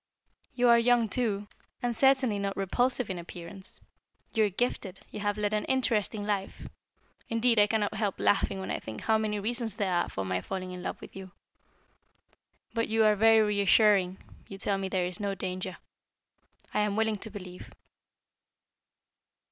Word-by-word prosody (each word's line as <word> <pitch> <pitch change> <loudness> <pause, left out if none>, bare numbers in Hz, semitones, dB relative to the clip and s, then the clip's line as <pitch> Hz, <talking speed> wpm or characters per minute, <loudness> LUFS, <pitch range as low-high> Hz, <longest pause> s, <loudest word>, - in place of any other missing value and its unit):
You 245 0 +3
are 235 0 +7
young 235 -1 +3
too, 210 -4 -1 0.4
and 240 -1 0
certainly 260 -5 +3
not 200 0 -2
repulsive 245 +4 0
in 180 - -4
appearance. 175 +2 -4 0.5
You 220 -2 +3
are - - +1
gifted, 200 -2 -2
you - - -6
have 205 0 -1
led 210 0 0
an 210 - +1
interesting 225 -5 0
life 200 -2 -3 0.6
indeed, 230 0 +3
I 205 - +6
cannot 210 -1 0
help 210 -2 -2
laughing 195 -1 +2
when 190 - -4
I - - -1
think 110 -1 -8
how 220 0 +2
many 210 -1 -1
reasons 225 0 -2
there 200 -4 -1
are 175 0 +1
for 95 - -4
my 95 0 -1
falling 185 - -5
in 180 0 -7
love - - -4
with - - -11
you. 190 -1 -9 1.4
But 230 -1 0
you 220 0 +2
are 210 0 +5
very 225 +1 +6
reassuring, 200 -2 +4 0.3
you 195 - -8
tell 195 0 0
me 190 -1 -3
there 185 -1 0
is 180 0 -4
no 200 -1 -2
danger. 185 -1 -4 1.0
I - - +1
am 210 -1 +1
willing 220 -1 +1
to 220 - -6
believe." 185 -3 -9
205 Hz, 170 wpm, -29 LUFS, 190-225 Hz, 1.4 s, are